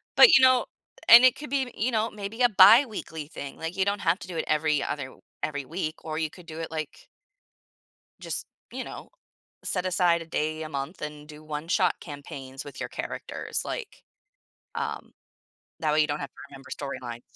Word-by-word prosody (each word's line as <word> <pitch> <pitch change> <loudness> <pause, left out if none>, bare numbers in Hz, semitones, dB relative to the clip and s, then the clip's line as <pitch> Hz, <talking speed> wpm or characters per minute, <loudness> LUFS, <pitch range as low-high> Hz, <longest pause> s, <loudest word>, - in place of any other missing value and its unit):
But, 470 - +9
you 265 - +4
know 255 -2 +6 0.4
and 235 +2 +11
it 255 0 +6
could 295 -1 -8
be, 265 -2 0
you 240 +4 0
know, 225 0 +1
maybe 210 +3 -6
a - - +8
biweekly 200 - +5
thing, 140 -3 -8
like, 165 +2 -5
you 190 - +2
don't 200 +1 0
have 170 0 +2
to - - -9
do 175 -2 -6
it - - -1
every 155 -1 +2
other 130 -3 -4 0.3
every 145 -2 -2
week, 155 +1 -3
or 155 -1 -3
you 160 -1 -1
could 180 +2 -15
do 160 -1 -8
it, 165 - -6
like 155 -2 -6 1.1
just, - - -3 0.3
you - - -4
know, - - -9 0.5
set 185 -1 -1
aside 175 -2 +3
a - - -7
day 155 0 -2
a 155 - -6
month 140 +4 -5
and 150 -1 -7
do 150 0 -12
one-shot 160 +5 0
campaigns 140 -3 -8
with 145 - -10
your - - -4
characters, - - -4
like, 460 -4 -6 0.7
um, - - -4 0.7
that 155 -2 +1
way 155 - +4
you 150 - +4
don't 145 0 -3
have 140 - -5
to - - -16
remember 135 -1 -13
storylines. 130 -4 -6
160 Hz, 195 wpm, -27 LUFS, 150-200 Hz, 1.1 s, and